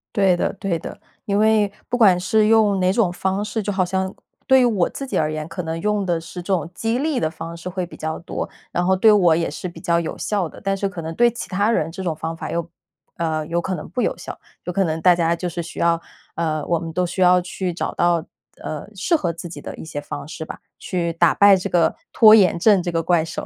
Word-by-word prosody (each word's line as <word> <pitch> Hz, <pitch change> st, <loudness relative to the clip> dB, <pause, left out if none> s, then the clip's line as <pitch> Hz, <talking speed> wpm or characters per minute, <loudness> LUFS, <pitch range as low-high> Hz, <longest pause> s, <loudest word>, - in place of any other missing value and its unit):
对 195 Hz, -3 st, +4 dB
的 -, -, -1 dB
对 195 Hz, -4 st, -2 dB
的。 -, -, -8 dB, 0.3 s
因 200 Hz, -1 st, 0 dB
为 215 Hz, -2 st, +3 dB, 0.2 s
不 245 Hz, -, 0 dB
管 200 Hz, -7 st, +6 dB
是 215 Hz, +3 st, +2 dB
用 215 Hz, -3 st, +4 dB
哪 185 Hz, 0 st, +2 dB
种 200 Hz, -5 st, +2 dB
方 190 Hz, +3 st, -1 dB
式 210 Hz, +1 st, -3 dB
就 205 Hz, 0 st, -2 dB
好 190 Hz, -1 st, +2 dB
像 190 Hz, +1 st, -2 dB, 0.3 s
对 265 Hz, -1 st, +6 dB
我 210 Hz, -7 st, +2 dB
自 275 Hz, -, -6 dB
己 -, -, -2 dB
而 155 Hz, -, +1 dB
言， 155 Hz, 0 st, -4 dB
可 180 Hz, +2 st, -5 dB
能 165 Hz, 0 st, -4 dB
用 210 Hz, 0 st, 0 dB
的 170 Hz, -2 st, 0 dB
是 180 Hz, +2 st, -8 dB
这 190 Hz, +3 st, -1 dB
种 175 Hz, -2 st, -1 dB
激 225 Hz, +5 st, -1 dB
励 295 Hz, -2 st, 0 dB
的 155 Hz, -, 0 dB
方 165 Hz, +1 st, -8 dB
式 170 Hz, -, -8 dB
会 180 Hz, 0 st, -3 dB
比 175 Hz, -, -13 dB
较 160 Hz, 0 st, -3 dB
多。 170 Hz, -, -5 dB, 0.2 s
然 175 Hz, -, 0 dB
后 190 Hz, +1 st, +3 dB
对 215 Hz, +4 st, +5 dB
我 180 Hz, -6 st, +5 dB
也 165 Hz, 0 st, 0 dB
是 155 Hz, +4 st, -5 dB
比 175 Hz, -, -10 dB
较 170 Hz, 0 st, +2 dB
有 165 Hz, -, -4 dB
效 200 Hz, -5 st, -1 dB
的， -, -, -13 dB
但 195 Hz, -1 st, 0 dB
是 200 Hz, -, -1 dB
可 195 Hz, -3 st, -6 dB
能 160 Hz, 0 st, -5 dB
对 240 Hz, 0 st, +5 dB
其 235 Hz, -, -7 dB
他 200 Hz, +3 st, +1 dB
人 160 Hz, -8 st, 0 dB
这 185 Hz, -, -7 dB
种 170 Hz, -3 st, -1 dB
方 160 Hz, +1 st, -5 dB
法 -, -, -6 dB
又 170 Hz, 0 st, -3 dB, 0.5 s
呃， 160 Hz, -2 st, -1 dB
有 170 Hz, +1 st, 0 dB
可 185 Hz, +2 st, -2 dB
能 155 Hz, -, -8 dB
不 220 Hz, +9 st, -2 dB
有 -, -, 0 dB
效， -, -, -8 dB, 0.3 s
有 180 Hz, -, -2 dB
可 195 Hz, +2 st, +1 dB
能 160 Hz, -1 st, -2 dB
大 180 Hz, +1 st, +6 dB
家 170 Hz, -1 st, +1 dB
就 175 Hz, +1 st, -3 dB
是 170 Hz, 0 st, -4 dB
需 165 Hz, -, -9 dB
要 170 Hz, 0 st, +3 dB, 0.4 s
呃， 155 Hz, -2 st, -1 dB
我 170 Hz, -1 st, +1 dB
们 165 Hz, -1 st, -6 dB
都 180 Hz, +2 st, +1 dB
需 175 Hz, +2 st, -4 dB
要 180 Hz, 0 st, +5 dB
去 180 Hz, 0 st, -4 dB
找 170 Hz, -, -3 dB
到， 170 Hz, -2 st, +2 dB, 0.4 s
呃， 155 Hz, +2 st, -5 dB
适 195 Hz, -, +1 dB
合 175 Hz, -, -2 dB
自 170 Hz, +1 st, -8 dB
己 165 Hz, -, -8 dB
的 -, -, -8 dB
一 -, -, -9 dB
些 160 Hz, -2 st, -5 dB
方 145 Hz, -, -7 dB
式 160 Hz, 0 st, -7 dB
吧， -, -, -8 dB, 0.2 s
去 170 Hz, -2 st, -2 dB
打 165 Hz, -1 st, +3 dB
败 200 Hz, -1 st, +6 dB
这 185 Hz, -, -4 dB
个 170 Hz, -2 st, +2 dB, 0.2 s
拖 215 Hz, -1 st, +8 dB
延 185 Hz, -5 st, +4 dB
症 200 Hz, +2 st, +4 dB
这 175 Hz, -, -2 dB
个 165 Hz, -1 st, 0 dB
怪 165 Hz, -1 st, +2 dB
兽。 -, -, -6 dB
180 Hz, 285 characters per minute, -21 LUFS, 165-200 Hz, 0.5 s, 拖